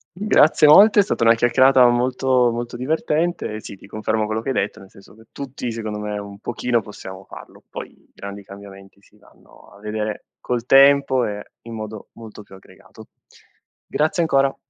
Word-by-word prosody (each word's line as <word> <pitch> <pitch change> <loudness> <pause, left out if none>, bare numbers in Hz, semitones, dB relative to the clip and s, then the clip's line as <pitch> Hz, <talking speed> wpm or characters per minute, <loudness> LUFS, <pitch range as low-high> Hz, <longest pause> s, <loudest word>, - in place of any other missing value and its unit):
Grazie 170 -6 +4
molte, 205 +7 +7
è - - +6
stata 190 - -2
una 115 0 +6
chiacchierata 125 +2 +4
molto, 125 0 +1
molto 120 +1 -5
divertente, 150 -3 -2
sì - - -10
ti 100 - -17
confermo 110 +1 -2
quello 110 +1 -3
che - - -4
hai - - 0
detto, - - -2
nel 95 - -16
senso 100 - -18
che 110 - -18
tutti, 130 -3 -6
secondo 110 -2 -5
me, 105 0 -5
un 100 0 -10
pochino 120 +1 -2
possiamo 95 -2 -11
farlo. - - -14
Poi - - -8
i - - -29
grandi 100 0 -9
cambiamenti 100 0 -14
si 105 +1 -26
vanno - - -22
a 100 - -17
vedere 105 0 -5
col 120 -1 -4
tempo 135 -2 +5
e 105 0 -5 0.2
in 115 0 -10
modo 110 -1 -8
molto 110 -2 -12
più - - -19
aggregato. 95 - -17 0.8
Grazie 155 +3 0
ancora! 135 -4 +1
115 Hz, 180 wpm, -20 LUFS, 105-135 Hz, 0.8 s, molte